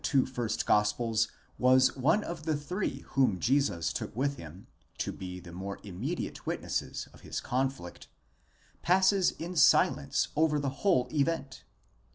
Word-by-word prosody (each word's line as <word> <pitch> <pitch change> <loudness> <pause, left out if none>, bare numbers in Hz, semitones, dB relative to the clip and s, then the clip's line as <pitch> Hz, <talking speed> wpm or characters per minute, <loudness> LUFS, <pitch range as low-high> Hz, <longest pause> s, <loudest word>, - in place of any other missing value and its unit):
641 135 -3 +3
two 130 - -14
first 120 -3 -2
gospels 110 +2 +2 0.3
was 130 0 +5
one 155 +11 +2
of 170 -3 -6
the 155 -2 +1
three 145 -2 -3
whom 125 -9 +2
Jesus 130 - +1
took - - -5
with 140 +3 0
him, 85 -1 -11 0.3
to - - -2
be 90 -1 -7
the 90 -1 -12
more 95 +3 -6
immediate 110 - -4
witnesses - - -3
of - - -17
his - - -4
conflict, 130 -8 -3 0.7
passes 190 +1 +4
in 175 +3 -6
silence 70 - +3
over 155 -1 +3
the 140 -1 -1
whole 170 -11 +3
event? 145 -2 -1
130 Hz, 150 wpm, -30 LUFS, 105-155 Hz, 0.7 s, was